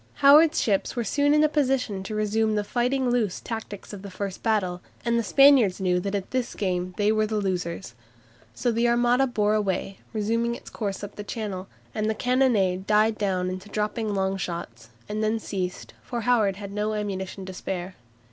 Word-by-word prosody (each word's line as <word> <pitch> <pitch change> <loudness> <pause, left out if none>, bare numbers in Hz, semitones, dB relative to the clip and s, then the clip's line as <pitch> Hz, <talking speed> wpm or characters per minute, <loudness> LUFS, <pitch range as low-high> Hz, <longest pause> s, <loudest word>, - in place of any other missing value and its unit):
Howard's 305 +3 +7
ships 200 +2 0
were 240 - -1
soon 285 +6 +2
in 300 +1 +5
a - - +6
position 265 -9 0
to 205 +3 -5
resume 215 +1 +1
the 210 - +1
"fighting 250 +3 0
loose" 225 -6 0
tactics 220 -3 -7
of 200 - -7
the 200 - -8
first 195 0 -5
battle, 190 -6 0 0.2
and 235 0 +2
the - - 0
Spaniards 270 -5 +5
knew 180 -2 +1
that 200 +2 -3
at 195 -2 -4
this 255 -2 -2
game 180 -2 -2
they 210 0 +3
were 215 0 +2
the 215 - -3
losers. 180 - -3 0.6
So 240 - 0
the 230 +1 +2
Armada 240 +2 +3
bore 210 -4 +1
away, 195 -2 -1
resuming 230 +2 0
its - - -11
course 200 -3 -4
up 205 - -6
Channel, 200 -5 -4 0.3
and 215 0 -1
the 220 - 0
cannonade 215 -7 +2
died 215 +1 +3
down 185 -3 0
into 185 +2 -7
dropping 210 0 -2
long 190 0 0
shots, 125 -11 -6 0.2
and 215 +1 -2
then 215 +1 +1
ceased, 185 -4 -4
for 240 -2 -4
Howard 220 -4 +2
had 200 0 -8
no 210 +1 -1
ammunition 195 -2 -4
to 190 - -7
spare. 185 0 -5
210 Hz, 190 wpm, -25 LUFS, 190-235 Hz, 0.6 s, Howard's